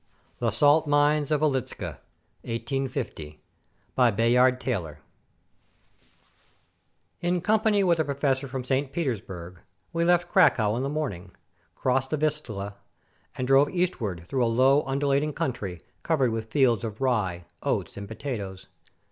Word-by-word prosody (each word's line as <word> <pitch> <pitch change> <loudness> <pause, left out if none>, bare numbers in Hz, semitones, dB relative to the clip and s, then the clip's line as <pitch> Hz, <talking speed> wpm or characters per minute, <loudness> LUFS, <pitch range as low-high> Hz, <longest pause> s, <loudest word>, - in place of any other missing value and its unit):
THE 120 - +1
SALT 145 +7 +4
MINES 145 0 +3
OF 150 -1 +1
WIELICZKA 135 -5 -2 1.9
BY 125 -2 +4
BAYARD 125 +2 +4
TAYLOR 95 - -3 2.2
In 175 +1 +1
company 215 +1 +2
with 170 -3 +3
a - - +4
professor 140 -1 -1
from 130 0 -4
St. 130 +2 -1
Petersburg, 95 - -4 0.3
we 170 0 +1
left 175 0 +3
Cracow 105 -2 +4
in 120 - -1
the 135 - -1
morning, 100 - -4 0.4
crossed 130 +1 0
the 155 - 0
Vistula, 120 -10 -3 0.6
and 130 - -1
drove 135 +2 +5
eastward 115 - -2
through 130 +3 0
a - - +3
low, 130 +5 +4
undulating 140 +2 +1
country, 100 -12 -4 0.2
cov 160 -4 0
ered 125 -3 +3
with 110 0 -4
fields 125 -7 +3
of 110 -2 -5
rye, 105 -10 0 0.2
oats, - - -2
and 100 0 -7
potatoes. 110 -5 -6
130 Hz, 130 wpm, -26 LUFS, 110-150 Hz, 2.2 s, drove